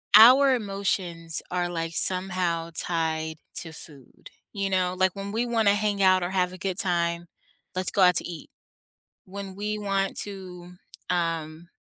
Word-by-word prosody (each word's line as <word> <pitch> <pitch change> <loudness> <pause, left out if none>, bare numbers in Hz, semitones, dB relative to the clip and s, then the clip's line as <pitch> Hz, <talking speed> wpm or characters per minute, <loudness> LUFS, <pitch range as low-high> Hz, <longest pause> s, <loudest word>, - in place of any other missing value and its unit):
our 260 +5 +8
emotions 190 -6 -1
are 180 -1 0
like, 165 -1 -3
somehow 180 -3 +1
tied 160 -2 -1 0.2
to 165 -2 -4
food, 140 -6 -11 0.2
you 200 -1 -1
know, 185 -1 +1
like 185 +1 +2
when 200 0 -5
we 235 +2 0
wanna 225 -4 +2
hang 205 -1 -1
out 185 -1 +4
or 175 - -2
have 180 -1 +1
a - - -9
good 185 0 -3
time 170 -2 0 0.5
"Let's 185 -1 0
go 200 - +1
out 180 -1 +6
to - - -1
eat." 170 -3 -9 0.8
When 195 0 -8
we 210 +1 -3
want 195 -1 -1
to, 180 -3 -9 0.4
um 165 -2 -2
185 Hz, 160 wpm, -26 LUFS, 170-200 Hz, 0.8 s, our